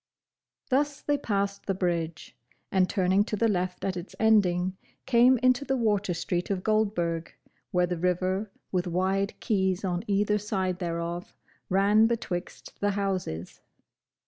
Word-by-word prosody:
Thus 285 +2 +1
they 290 - +2
passed 200 -7 -2
the 195 - 0
bridge, 170 -3 -2 0.4
and 185 -1 +3
turning 190 0 +3
to 215 - -2
the 225 +3 +2
left 180 -3 -1
at 190 -1 -1
its 175 +1 -7
ending, 190 -4 +3 0.3
came 250 0 +5
into 255 +2 +4
the 270 -1 0
Water 205 -6 +1
Street 175 +1 -2
of 190 -2 -1
Goldburg, 175 -7 0 0.4
where 180 0 +2
the 175 -1 -3
river, 185 +3 0 0.2
with 180 -1 0
wide 190 +3 0
quays 190 -4 0
on 175 -1 -1
either 210 +1 +2
side 190 -3 -2
thereof, 170 0 -4 0.3
ran 205 +4 +4
betwixt 200 -6 -4
the 205 - +1
houses. 185 - -3
190 Hz, 145 wpm, -27 LUFS, 180-210 Hz, 0.4 s, came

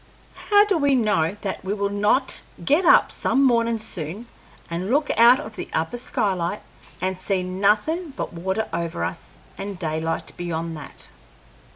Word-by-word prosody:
How 410 0 +7
do 395 -5 +1
we 285 -2 +3
know 205 -6 +1
that 195 - -4
we 195 +2 -2
will 200 -1 -1
not 210 +6 +3 0.2
get 315 - +3
up - - +6
some 270 +1 +1
mornin' 235 -3 +3
soon 200 -1 -5 0.4
and 175 +4 -4
look 290 +4 +2
out 240 +3 +7
of 220 -7 -8
the - - -6
upper 165 +9 -1
skylight 200 -6 -2 0.4
and 185 +1 -1
see 185 0 -1
nothin' 210 - +1
but - - -4
water 190 +6 -2
over 170 - -2
us 85 -7 -6 0.2
and 200 -1 -5
daylight 160 -1 -3
beyond 165 -1 -3
that?" 150 - -9
200 Hz, 160 wpm, -23 LUFS, 170-240 Hz, 0.4 s, How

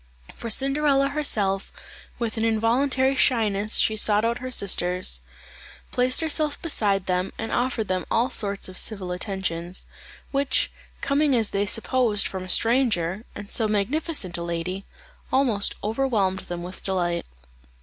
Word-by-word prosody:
For 230 - -6
Cinderella 275 +3 +2
herself, 205 -10 0 0.5
with 230 -3 -3
an 220 - -1
involuntary 250 +4 +2
shyness 215 -5 +2
she 220 - +3
sought 210 0 +3
out 235 +1 0
her 255 - -5
sisters; 180 - 0 0.7
placed 255 +3 +3
herself 310 -2 +1
beside 200 - +1
them 180 +1 -1
and 225 - -4
offered 245 -3 0
them 185 -2 -2
all 245 +4 +1
sorts 200 -4 -1
of 185 0 -2
civil 195 -5 -2
attentions, 180 -2 -2 0.5
which, 275 0 +1 0.3
coming 280 0 +2
as 225 -3 +2
they 200 +1 0
supposed 225 -1 +1
from 190 -1 -4
a 185 - -9
stranger, 220 -4 +2
and 205 - -8
so 225 - +1
magnificent 210 - -1
a - - -4
lady, 170 +3 -4 0.5
almost 240 -7 +2
overwhelmed 215 -4 0
them 175 0 -4
with 180 +1 -8
delight. 175 -3 -1
215 Hz, 140 wpm, -24 LUFS, 190-255 Hz, 0.7 s, she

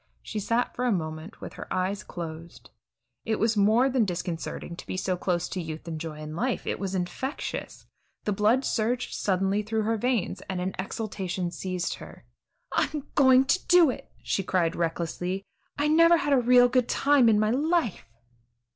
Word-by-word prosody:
She 215 - -4
sat 230 +4 0
for 250 - -1
a 245 - +2
moment 160 +1 -4
with - - -7
her - - -9
eyes 185 +2 -1
closed. 165 -1 -8 0.5
It 220 - 0
was 225 +1 +1
more 215 +5 +4
than 260 -3 +2
disconcerting 175 -2 -4
to - - -10
be - - -3
so 185 0 0
close 175 -1 -1
to 185 - -3
youth 160 0 -7
and 160 -2 -4
joy 165 -2 -4
and 155 0 -7
life; 245 +6 -1
it - - -2
was 195 -1 -3
infectious. 185 +10 -4 0.4
The 210 - -1
blood 215 +7 +2
surged 240 +2 -1
suddenly 195 +1 +1
through 220 +1 -1
her 225 +1 0
veins, 215 -5 -1
and 190 -1 -2
an 185 +1 -2
exultation 190 -3 -3
seized 180 -1 -3
her. - - -12 0.5
"I'm 295 -2 -1
going 260 -2 +6
to 365 +7 +1
do 350 -6 +6
it," - - -9
she - - 0
cried 180 -3 0
recklessly; 175 +3 -2 0.3
"I 290 +1 +1
never 335 +2 +6
had 290 -3 +1
a 270 - +5
real 245 +1 +6
good 250 -1 +1
time 275 -4 +4
in 210 -2 +4
my 215 0 +2
life." 295 - 0
210 Hz, 180 wpm, -27 LUFS, 180-250 Hz, 0.5 s, going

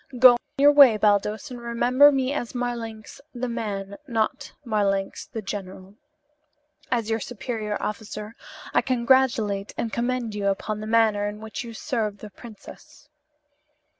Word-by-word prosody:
Go 245 -1 +8 0.2
your 285 +1 +7
way, 275 -7 +7
Baldos, 210 +4 +1
and 245 -1 -8
remember 245 +4 +4
me 270 0 0
as 250 -4 -4
Marlanx 235 -1 -5
the 250 +1 -3
man, 200 -4 -4
not 240 +4 -2
Marlanx 200 -3 -1
the 225 - -6
general. 190 -1 -7 1.0
As 230 -3 -1
your 225 - +1
superior 220 -2 -4
officer, 210 +1 -6 0.4
I - - +4
congratulate 235 -5 +1
and 225 - -3
commend 240 -2 -1
you 205 -1 -2
upon 205 +2 -2
the 215 - -6
manner 220 -2 +2
in 210 0 -9
which 220 +2 -6
you 230 -1 -9
serve 220 -7 -2
the 210 0 -11
princess." 235 +6 -14
225 Hz, 140 wpm, -24 LUFS, 210-245 Hz, 1.0 s, Go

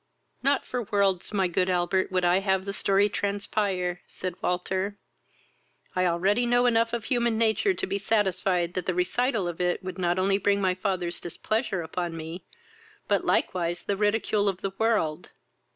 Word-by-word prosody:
"Not 280 +2 +2
for 250 - -3
worlds, 200 -4 0
my 195 -3 +1
good 180 +1 0
Albert, 180 +1 +1
would 185 -1 +1
I 175 +2 +4
have 190 -1 0
the 200 - -3
story 200 +1 +3
transpire! 200 -3 -1
(said 185 -1 -5
Walter.) 190 +3 -1 1.0
I 185 0 +2
already 195 +8 +2
know 245 +1 +3
enough 230 -1 +3
of 235 -2 -2
human 235 -3 +1
nature 230 - +2
to - - -2
be 195 +1 -2
satisfied 190 -4 +1
that 185 -1 -3
the 185 - 0
recital 205 +3 0
of 175 0 -4
it 180 +1 0
would 185 0 -6
not 175 0 +1
only 195 +1 +2
bring 200 0 +2
my 190 -2 +2
father's 185 -2 -2
displeasure 195 +2 -2
upon 170 0 -4
me, 160 +3 -7 0.6
but - - +2
likewise 175 -1 0
the 200 - -1
ridicule 205 0 +1
of 185 -1 -4
the 195 - -2
world. 215 -9 0
190 Hz, 170 wpm, -27 LUFS, 180-210 Hz, 1.0 s, I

